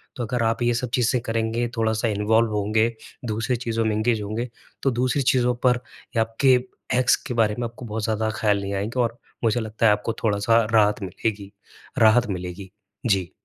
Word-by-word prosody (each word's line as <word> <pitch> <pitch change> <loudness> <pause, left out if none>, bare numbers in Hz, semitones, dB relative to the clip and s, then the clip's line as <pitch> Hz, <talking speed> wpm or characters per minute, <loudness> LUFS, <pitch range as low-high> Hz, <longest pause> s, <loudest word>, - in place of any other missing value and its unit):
तो 125 - -3
अगर 120 +1 -1
आप 115 +1 0
ये 120 0 +2
सब 125 +1 -2
चीज़ें 125 0 +1
करेंगे, 115 +1 -1
थोड़ा-सा 110 0 +1
इन्वॉल्व 110 +2 +2
होंगे, 110 +2 +2 0.4
दूसरी 115 +3 -1
चीज़ों 115 -1 -2
में 110 -1 +1
एंगेज 110 0 +1
होंगे 110 +4 -3 0.3
तो 135 - +3
दूसरी 125 +3 0
चीज़ों 125 -1 +2
पर 125 -1 +3 0.4
आपके 115 +4 +3 0.4
एक्स 125 - +4
के 125 - -3
बारे 110 -2 +2
में 120 - -1
आपको 115 +2 -11
बहुत 110 -1 -4
ज़्यादा 110 0 0
ख़्याल 105 -2 +2
नहीं 100 0 -4
आएँगे 105 +6 -2
और 115 0 -1 0.3
मुझे 115 +1 +2
लगता 110 0 -2
है - - +6
आपको 105 +2 -2
थोड़ा-सा 115 +2 +3
राहत 105 -1 +4
मिलेगी 100 +1 -3 0.5
राहत 115 +2 +5
मिलेगी। 90 0 -5 0.4
जी। 95 -6 +1
110 Hz, 185 wpm, -24 LUFS, 105-120 Hz, 0.5 s, है